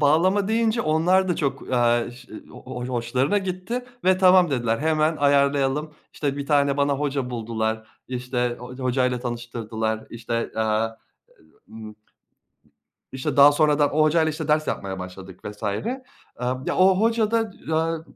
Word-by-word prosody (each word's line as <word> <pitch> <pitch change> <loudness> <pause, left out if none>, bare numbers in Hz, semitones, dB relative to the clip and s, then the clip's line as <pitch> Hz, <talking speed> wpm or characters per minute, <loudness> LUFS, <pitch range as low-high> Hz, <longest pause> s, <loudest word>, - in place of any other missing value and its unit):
bağlama 185 +7 +3
deyince 225 +1 +1
onlar 180 +5 +2
da 175 - 0
çok, 140 -3 -3
aaa, 120 -1 +2
ş 125 +1 -15 0.2
ho - - -12
ho 125 -1 -5
hoşlarına 130 - 0
gitti 190 +6 -4 0.2
ve 185 0 +4
tamam 185 -3 +5
dediler. 120 -3 0
Hemen 155 +1 +1
ayarlayalım 140 +1 +1 0.2
işte 140 -2 -2
bir 140 -1 -4
tane 140 -2 +2
bana 140 0 +2
hoca 135 -3 -2
buldular 110 -1 -3 0.2
işte 125 -1 -2
ho 125 +1 -9
hocayla 125 -1 0
tanıştırdılar 115 -2 -4
işte, 115 0 -4
aaa, 110 0 +1 0.8
ııı, 110 +1 -11
ımm 110 -1 -9 1.2
İşte 130 +1 -3
daha 140 +1 +9
sonradan 150 -1 +2
o 155 - +3
hocayla 160 +1 +3
işte 155 0 -5
ders 155 0 +2
yapmaya 95 -1 -3
başladık 90 0 -9
vs. 105 +1 -8
Eee, 205 - -2 0.7
ya, - - -1
o 185 0 +5
hocada, 225 0 +1 0.2
eee, 160 0 0
140 Hz, 150 wpm, -23 LUFS, 120-160 Hz, 1.2 s, daha